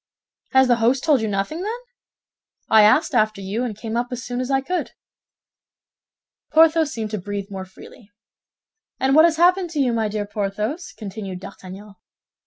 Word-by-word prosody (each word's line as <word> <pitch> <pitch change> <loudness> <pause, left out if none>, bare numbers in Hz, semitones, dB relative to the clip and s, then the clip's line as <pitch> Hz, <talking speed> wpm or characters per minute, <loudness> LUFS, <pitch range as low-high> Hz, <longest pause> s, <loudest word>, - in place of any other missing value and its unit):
"Has 265 0 +5
the 240 -1 +3
host 245 +4 +1
told 295 -6 +3
you 220 - -1
nothing, 205 - -2
then?" 440 +5 -4 0.9
"I 220 - +7
asked 210 +1 +4
after 215 -1 +1
you, 200 +5 -3
and 225 -5 -4
came 225 0 -5
up 240 +1 0
as 250 -2 -6
soon 245 0 -4
as 255 - -4
I 270 -1 +2
could." 355 +7 -3 1.6
Porthos 320 -1 +4
seemed 220 -2 -5
to 215 - -3
breathe 200 +1 -6
more 190 -1 -6
freely. 195 +3 -16 0.9
"And 265 0 +2
what 315 +3 +7
has 330 -1 +2
happened 360 +1 +3
to 300 - -2
you, 255 -4 +2
my 225 -2 0
dear 210 0 -3
Porthos?" 210 - -4
continued 195 -3 -7
D'Artagnan. 195 +2 -11
230 Hz, 175 wpm, -22 LUFS, 205-275 Hz, 1.6 s, I